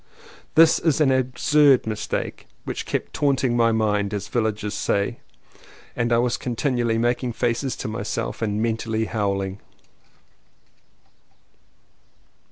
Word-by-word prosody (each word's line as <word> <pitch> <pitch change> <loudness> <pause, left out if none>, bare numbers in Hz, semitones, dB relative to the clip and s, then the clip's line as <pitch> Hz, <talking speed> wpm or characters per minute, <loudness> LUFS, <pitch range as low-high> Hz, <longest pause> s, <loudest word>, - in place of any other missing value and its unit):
This 160 0 +6 0.2
absurd 135 +1 +3
mistake 110 -1 -4 0.2
kept - - -4
''taunting 135 -3 +1
my 115 -1 +3
mind," 105 -2 0
as 100 - -5
village 110 -3 -1
people 105 - -3
say, 100 +2 -1 0.8
and 120 0 -1
I 115 - +4
was 120 -2 +1
continually 120 -2 -1
making 120 +1 0
faces 120 +3 -1
to - - -5
myself 110 +2 -4
and 105 -2 -1
mentally 110 -1 -1
howling. 100 -3 -2
115 Hz, 105 wpm, -23 LUFS, 110-125 Hz, 0.8 s, This